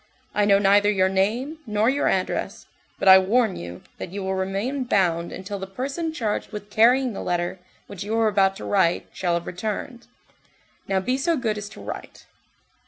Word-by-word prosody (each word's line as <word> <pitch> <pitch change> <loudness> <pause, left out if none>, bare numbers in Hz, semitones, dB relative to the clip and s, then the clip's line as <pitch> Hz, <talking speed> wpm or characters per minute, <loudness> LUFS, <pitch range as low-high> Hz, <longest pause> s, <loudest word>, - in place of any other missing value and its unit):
I 210 - +2
know 200 -1 +5
neither 205 +1 +4
your 190 -2 +2
name, 230 +11 -1
nor 210 +1 +1
your 275 +3 +2
address, - - -1 0.3
but - - -2
I 190 0 +10
warn 215 +2 +2
you, 85 +1 -8 0.2
that - - -5
you 200 0 -5
will 190 0 -1
remain 195 +9 -2
bound 175 -7 +1
until 200 +2 -6
the 190 - -6
person 275 - -3
charged 230 -9 -3
with 210 -1 -8
carrying 245 +3 +4
the - - -5
letter 175 +1 -2 0.3
which 200 -3 -7
you 220 +2 -2
are 225 -1 +3
about 195 -2 +3
to - - -8
write 190 -4 +1
shall 175 -2 0
have 170 - -3
returned. 220 +6 -5 0.8
Now, 190 -1 +1
be 255 +7 -1
so 335 +3 +1
good 225 -5 -1
as 205 -1 -6
to - - -12
write." - - -8
205 Hz, 190 wpm, -24 LUFS, 190-235 Hz, 0.8 s, I